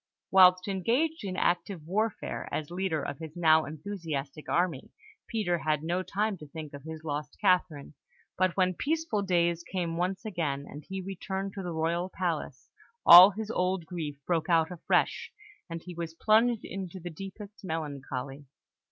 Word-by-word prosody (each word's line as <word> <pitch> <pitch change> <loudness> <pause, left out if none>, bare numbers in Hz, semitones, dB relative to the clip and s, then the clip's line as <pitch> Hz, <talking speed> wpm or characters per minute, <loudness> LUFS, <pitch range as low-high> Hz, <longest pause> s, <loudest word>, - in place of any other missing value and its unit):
Whilst 185 0 +6
engaged 235 - 0
in 190 -2 -4
active 175 -2 0
warfare, 215 +6 -2
as 155 +1 -3
leader 175 -4 -1
of 140 - -5
his 160 -2 -8
now 160 -2 +4
enthusiastic 155 -3 -5
army, 170 -6 0 0.4
Peter 200 -7 0
had 155 -1 0
no 175 +3 0
time 205 +2 -1
to 150 - -10
think 155 0 -8
of 140 - -8
his 160 +2 -8
lost 150 -1 -4
Catherine; 180 -8 +1 0.4
but 185 -1 +1
when 185 -1 +3
peaceful 310 - -1
days 170 -3 +1
came 170 -2 -3
once 185 +4 -2
again, 150 -9 -2
and 150 +1 -9
he 190 0 -4
returned 195 +1 -4
to 195 - -5
the 180 -2 -4
royal 170 +3 -1
palace, 170 -8 -3 0.4
all 180 +3 +12
his 215 +2 -5
old 180 -3 0
grief 160 -5 -5
broke 170 -1 0
out 165 0 +3
afresh, 175 - 0 0.4
and 165 -1 -6
he 180 - -8
was 165 -1 -6
plunged 225 +4 +3
into 190 -1 -6
the 175 0 -7
deepest 195 +5 -10
melancholy. 140 -4 -5
175 Hz, 160 wpm, -29 LUFS, 160-195 Hz, 0.4 s, all